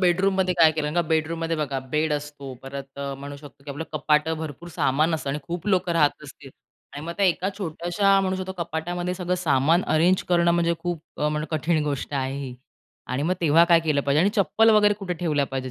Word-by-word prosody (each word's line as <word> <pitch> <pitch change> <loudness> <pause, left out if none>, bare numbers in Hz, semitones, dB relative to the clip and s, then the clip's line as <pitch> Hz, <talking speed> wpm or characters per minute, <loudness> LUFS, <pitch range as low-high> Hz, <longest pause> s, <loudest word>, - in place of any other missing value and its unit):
बेडरूममध्ये 185 +1 +2
काय 165 -2 +6
केलं? 155 -1 -2
कारण 150 - -3
का 175 - +3
बेडरूमध्ये 165 +1 0
बघा, 145 -3 -2
बेड 155 0 +1
असतो 145 -2 -5
परत 135 0 -8
अ, 140 0 -4
म्हणू 140 +1 -8
शकतो, 140 -1 -15
की 145 - -7
आपलं 155 +4 -5
कपाटं 155 +1 +1
भरपूर 160 +2 -7
सामान 155 +1 +1
असतं 140 -3 -3
आणि 145 - -2
खूप 170 +5 -6
लोक 185 -2 +1
राहत 155 -3 +2
असतील 140 -1 -12 0.4
आणि 145 +2 -7
मग 170 - -3
त्या 200 - +3
एका 180 +1 +1
छोट्याशा, 195 +2 +1
म्हणू 190 0 -1
शकतो 190 0 -4
कपाटामध्ये 175 +2 -3
सगळं 180 0 -2
सामान 160 +1 +2
अरेंज 175 +4 +3
करणं 170 -1 +3
म्हणजे 170 0 +2
खूप 175 -3 -3 0.2
अ, 150 - +1
म्हणलं 150 0 -2
कठीण 155 0 0
गोष्ट 145 -1 -3
आहे 135 0 -2
ही 135 -3 -6 0.5
आणि 130 +2 -2
मग 175 +4 +1
तेव्हा 165 0 +5
काय 170 -1 +5
केलं 155 -3 +1
पाहिजे? 140 +2 +2
आणि 195 +4 +3
चप्पल 220 +3 +4
वगैरे 210 -1 +5
कुठे 195 -3 -4
ठेवल्या 155 -4 0
पाहिजेत? 130 -1 -4
160 Hz, 215 wpm, -24 LUFS, 145-175 Hz, 0.5 s, काय